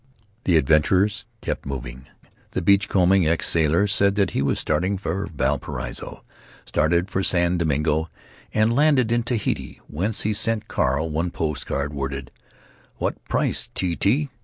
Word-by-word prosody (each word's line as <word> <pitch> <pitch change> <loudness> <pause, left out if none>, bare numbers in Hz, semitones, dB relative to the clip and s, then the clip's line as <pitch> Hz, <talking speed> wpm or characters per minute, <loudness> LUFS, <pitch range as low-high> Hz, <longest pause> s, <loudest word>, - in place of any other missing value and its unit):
The 85 -3 +4
adventurers 80 +8 +2
kept - - -3
moving. 65 -1 -7 0.5
The - - -1
beach 100 +2 +4
combing 95 -2 +3
ex 80 +1 +1
sailor 85 +3 +3
said 100 -1 +2
that 100 -2 +1
he - - -1
was 70 - +1
starting 95 +3 0
for 100 0 -3
Valparaiso, 65 -3 -3 0.4
started 85 +4 +1
for 95 -1 -1
San 85 -1 +2
Domingo, 80 0 0 0.4
and 110 +2 +2
landed 140 -5 +3
in 120 0 +2
Tahiti, 115 -3 -2
whence 100 +8 -2
he 110 - 0
sent 110 +1 0
Carl 75 +5 0
one 80 +4 -1
post 75 -4 -3
card, 70 +1 -2
worded, 70 -1 -4 0.7
"What - - -3
price - - 0
T. 90 -2 -1
T.?" 135 - +1
85 Hz, 150 wpm, -23 LUFS, 75-100 Hz, 0.7 s, The